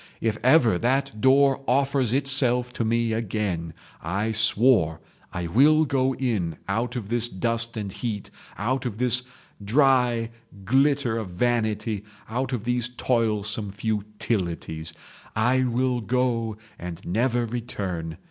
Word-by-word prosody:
_ - - -19 0.2
If 110 -1 -1
ever 125 - +4
that 130 -2 0
door 135 +1 +4
offers 135 -2 +1
itself 130 -2 +4
to 120 - -2
me 115 0 0
again, 100 -7 -3 0.3
I 100 +7 -2
swore, 110 -7 +3 0.3
I 90 - -4
will 150 - +4
go 130 -2 0
in 100 - -2
out 115 +5 -2
of 110 -5 -5
this 120 0 +1
dust 115 +3 -1
and 100 -3 -4
heat, 105 -1 -5 0.3
out 130 +5 -1
of 105 -3 -6
this 125 0 +3 0.4
dry 120 -1 +2 0.3
glitter 135 0 +2
of 105 -4 -6
vanity, 110 0 -1 0.2
out 130 +4 -3
of 120 -5 -3
these 120 -1 -1
toilsome 110 -4 0
futilities. 100 -6 -3 0.4
I 125 +4 +2
will 125 0 0
go 115 -2 -1 0.2
and 85 -1 -6
never 120 +5 0
return. 95 -9 -5
115 Hz, 130 wpm, -24 LUFS, 105-125 Hz, 0.4 s, ever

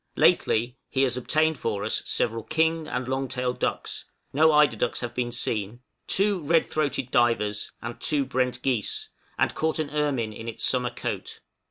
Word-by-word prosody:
Lately 120 +3 +3
he 135 - +2
has 125 -3 +1
obtained 155 +4 +1
for 105 -3 -2
us 110 - 0
several 115 -1 0
king 160 +5 +1
and 125 -3 -3
long 135 +1 -1
tailed 125 -1 -2
ducks - - -2 0.3
(no 155 +3 +5
eider 150 -5 +5
ducks 115 +2 -1
have 120 -1 -4
been 120 0 -1
seen), 115 -1 -2 0.3
two 200 0 +2
red 160 +2 +3
throated 145 -4 -1
divers, 115 -5 +1
and 120 0 -6
two 145 -3 +2
brent 125 -1 -1
geese, 125 -6 -1 0.3
and - - +2
caught 160 0 0
an 155 -2 -2
ermine 140 -7 0
in 115 +2 -8
its 115 - -3
summer 125 -1 +2
coat. 120 - -5
125 Hz, 175 wpm, -26 LUFS, 120-150 Hz, 0.3 s, no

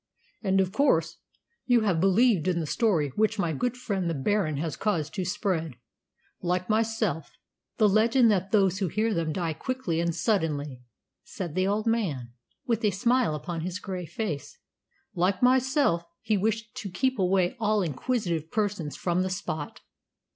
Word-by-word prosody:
"And 195 -2 +2
of 190 -1 +1
course 170 - +2 0.5
you 245 -2 +5
have 195 -6 +1
believed 195 -1 +3
in 175 -2 +1
the 165 - -2
story 165 - +1
which 215 - 0
my 170 -5 0
good 245 - -1
friend 195 -8 -2
the 165 - -1
Baron 155 +1 0
has 155 0 -2
caused 160 -8 -1
to 190 - -2
be - - -2
spread, 175 - -1 0.7
like 180 +1 -1
myself: 215 -7 0 0.5
the 215 - +5
legend 225 +3 +4
that 190 -1 0
those 195 -3 +3
who 195 - 0
hear 215 +6 0
them 165 -4 -1
die 165 -1 -2
quickly 195 -2 -2
and 170 -1 0
suddenly," 150 - -1 0.4
said 175 -5 -6
the 185 +2 +1
old 210 +2 0
man, 175 - -1 0.3
with 230 -1 0
a 210 - +4
smile 235 -1 +1
upon 165 +2 -4
his 180 +2 -3
grey 185 -3 -5
face. 155 -5 -4 0.6
"Like 185 +3 +1
myself, 260 - +3 0.2
he 220 -1 +1
wished 215 +2 -1
to 200 - -5
keep 260 +6 0
away 185 +2 +2
all 215 -2 +2
inquisitive 170 - -2
persons 200 -8 -2
from 175 0 0
the 185 - -1
spot." 160 -5 -5
190 Hz, 170 wpm, -27 LUFS, 165-220 Hz, 0.7 s, you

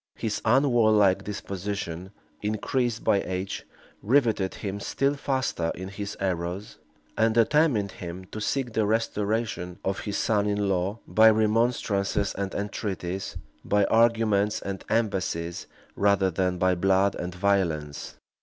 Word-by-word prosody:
His 110 -2 -3
unwarlike 110 -6 +4
disposition, 100 -3 -5 0.3
increased 115 +3 -1
by 100 - +3
age, 95 +1 -4 0.3
rivetted 110 -5 +2
him 100 -1 -4
still 135 +6 0
faster 130 -12 -1
in 95 +1 -6
his 100 +1 -6
errors, 90 +1 -3 0.4
and 110 0 +2
determined 115 - +3
him 90 +1 -8
to 110 - -5
seek 125 +1 -1
the 110 -2 +1
restoration 105 -4 -1
of 95 0 -1
his 100 -2 -3
son 105 -2 +1
in 105 -1 0
law, 95 +2 0
by 110 +1 +6
remonstrances 110 -2 +1
and 100 -1 -4
entreaties, 95 -2 -4 0.3
by 105 0 +2
arguments 110 -3 +3
and 100 -1 -5
embassies, 90 -6 -1 0.3
rather 100 -2 +3
than 90 +1 0
by 95 +1 +3
blood 95 +2 +2
and 90 0 -5
violence. 85 -7 -1
100 Hz, 125 wpm, -26 LUFS, 95-110 Hz, 0.4 s, by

